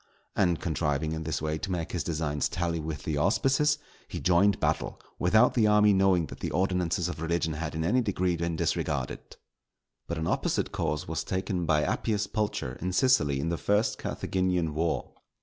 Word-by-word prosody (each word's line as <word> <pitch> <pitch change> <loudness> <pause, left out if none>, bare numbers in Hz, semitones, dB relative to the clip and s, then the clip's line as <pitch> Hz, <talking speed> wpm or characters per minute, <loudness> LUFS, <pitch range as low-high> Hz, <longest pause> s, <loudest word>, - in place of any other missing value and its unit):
And 90 -5 +2
contriving, 75 +2 -1
in 80 0 -4
this 80 -1 -2
way 80 0 -1
to 95 - -4
make 85 -3 -2
his 90 - -2
designs 75 -3 -1
tally 85 -1 -1
with 75 -2 -5
the 75 -2 -2
auspices, 135 - +2 0.3
he - - -5
joined 95 +3 +3
battle, - - -1 0.2
without 110 +7 +4
the 110 -4 +3
army 105 0 +5
knowing 95 -3 +3
that - - -10
the - - -3
ordinances 90 -1 0
of 90 -3 -5
religion 80 -1 0
had 80 0 -4
in 80 - -1
any 120 +10 +2
degree 95 -5 0
been 85 0 -2
disregarded. - - -2 0.7
But 85 - -3
an 80 - -2
opposite - - 0
course 75 -1 -2
was - - -2
taken 95 -2 -2
by 75 -1 +3
Appius 105 -2 0
Pulcher, 100 - -3
in 90 +2 -2
Sicily, 90 - +3
in 80 +4 -1
the 85 - -2
first 105 +2 +1
Carthaginian 90 -4 -1
war. 80 +2 -1
85 Hz, 185 wpm, -28 LUFS, 80-95 Hz, 0.7 s, army